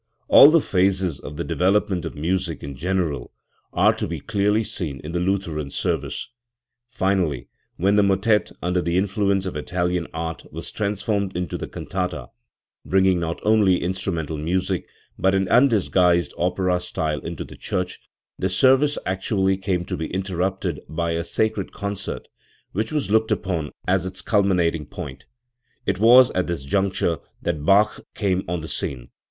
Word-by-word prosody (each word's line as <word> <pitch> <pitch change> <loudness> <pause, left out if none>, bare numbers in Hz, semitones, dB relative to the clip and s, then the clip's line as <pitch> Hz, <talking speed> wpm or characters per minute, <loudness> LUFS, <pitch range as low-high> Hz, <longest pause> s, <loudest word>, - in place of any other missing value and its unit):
All 140 - +9
the 165 +1 +5
phases 95 - +1
of 75 +1 -9
the 85 - -2
development 90 +1 +1
of 80 - -6
music 85 +2 -2
in 70 -1 -6
general 80 -5 -2 0.4
are - - +4
to - - -2
be 85 -1 -4
clearly 105 +3 +1
seen 75 -10 -4
in 75 - -6
the 85 - -1
Lutheran 90 -6 -1
service. - - -2 0.6
Finally, 90 - 0 0.3
when 100 +4 +2
the - - +6
motet, 100 +2 +2
under 90 +1 +1
the 85 0 0
influence 100 0 +1
of 95 - -4
Italian 90 +2 -1
art, 80 0 -5
was - - -6
transformed 100 -2 -1
into 90 -1 -3
the - - -4
cantata, 90 -9 -4 0.5
bringing 95 -1 +3
not 85 -1 -3
only 105 -4 +4
instrumental 90 -4 -2
music 90 +4 -1 0.3
but 95 +1 +3
an 95 -1 +1
undisguised 90 - +3
opera 90 0 0
style 80 -4 -2
into 85 -2 -5
the - - -12
church, 90 -1 -3 0.4
the 95 - 0
service 135 +8 +4
actually 95 +1 +1
came 95 -2 -2
to - - -3
be 80 - -3
interrupted 95 0 -2
by 85 +1 -1
a 85 0 -1
sacred 110 +2 -1
concert, 100 -1 -5 0.4
which 110 +4 -2
was 150 -8 -1
looked 110 0 +3
upon 85 -6 -1 0.2
as 95 0 +2
its 95 0 -5
culminating 90 -7 +1
point, 75 -7 -8 0.6
It 95 0 -1
was 125 +3 +7
at 90 - -1
this 85 -5 -3
juncture 95 +1 0 0.2
that 80 -4 -2
Bach 105 +5 +3
came 95 -3 0
on 85 -1 -2
the 80 - -7
scene. 65 -6 -3
95 Hz, 160 wpm, -23 LUFS, 85-100 Hz, 0.6 s, All